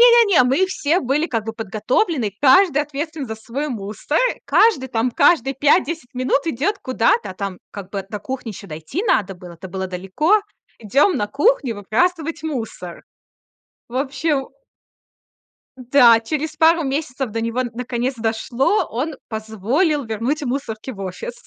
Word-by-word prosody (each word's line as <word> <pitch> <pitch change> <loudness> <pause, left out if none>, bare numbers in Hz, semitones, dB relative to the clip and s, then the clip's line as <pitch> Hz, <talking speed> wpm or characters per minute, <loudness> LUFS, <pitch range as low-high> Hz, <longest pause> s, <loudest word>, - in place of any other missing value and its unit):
не 475 -1 +7
не, 255 - +6
мы 270 +10 +2
все 345 -1 +1
были, 280 +5 0
как 225 -7 -2
бы, 225 - -4
подготовлены. 225 - -1
Каждый 295 +1 +5
ответственен 295 0 -5
за 220 - -5
свой 235 +7 -4
мусор. 215 +5 -2
Э, - - -12
каждый 380 - +3
там 235 0 0
каждые 270 -1 +3
5-10 290 0 +1
минут 255 +3 0
идёт 330 - -1
куда-то, 230 -5 +1
там, 195 -1 -5
как 200 -3 -8
бы 195 -2 -5
до 210 - -5
кухни 255 +1 -5
ещё 200 0 -10
дойти 160 - -5
надо 210 - +1
было. 180 -1 -11
Это 170 +3 -10
было 190 +1 -4
далеко. 195 - +1 0.4
Идём 275 - +2
на 205 - -1
кухню 285 - +1
выбрасывать 315 - -1
мусор. 225 - -5 0.9
В 240 - -6
общем 275 +1 -1 1.3
Да, 245 -2 +5
через 310 +5 -3
пару 325 +1 +4
месяцев 270 -3 -3
до 225 +1 -2
него 230 +3 -1
д 245 - -4
наконец, 250 +2 -2
дошло. 235 - 0
Он 275 +7 -3
позволил 225 - -1
вернуть 235 +8 -2
мусорки 250 -2 -4
в 200 - -11
офис. 195 - -5
255 Hz, 155 wpm, -20 LUFS, 220-300 Hz, 1.3 s, не